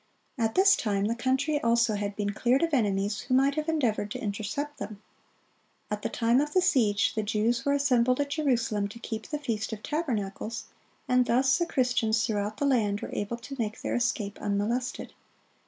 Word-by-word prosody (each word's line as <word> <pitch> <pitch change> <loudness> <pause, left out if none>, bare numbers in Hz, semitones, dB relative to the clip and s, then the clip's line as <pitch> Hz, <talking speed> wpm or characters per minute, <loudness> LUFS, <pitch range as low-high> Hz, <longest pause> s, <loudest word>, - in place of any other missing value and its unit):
At 225 -3 -1
this 390 +1 +6
time 200 -3 0
the 225 - +1
country 265 +5 0
also 235 -1 +3
had 205 0 -3
been 205 -1 -1
cleared 250 +7 +2
of 330 -2 0
enemies 205 -4 +1
who 255 - -1
might 275 +2 +4
have 310 +2 -2
endeavored 240 -10 0
to - - -5
intercept 220 +8 -4
them. 205 0 -6 0.9
At 210 0 -2
the - - -2
time 235 +3 +2
of 295 0 -3
the 370 - +5
siege, 210 - +2
the 220 - -1
Jews 220 +3 0
were 280 - +3
assembled 255 -3 +2
at 285 0 -1
Jerusalem 235 -9 0
to 205 - -11
keep 220 -1 -6
the 300 - -3
Feast 230 -7 -3
of 215 - -7
Tabernacles, 230 -8 -3 0.4
and 250 -1 +3
thus 265 +5 +3
the 345 - 0
Christians 245 -5 +1
throughout 210 0 -2
the 285 - 0
land 215 -7 +1
were - - -6
able 205 +3 -3
to 240 +4 -8
make 215 -1 -3
their - - -2
escape 240 -4 -1
unmolested. 210 +5 -2
235 Hz, 190 wpm, -28 LUFS, 210-270 Hz, 0.9 s, this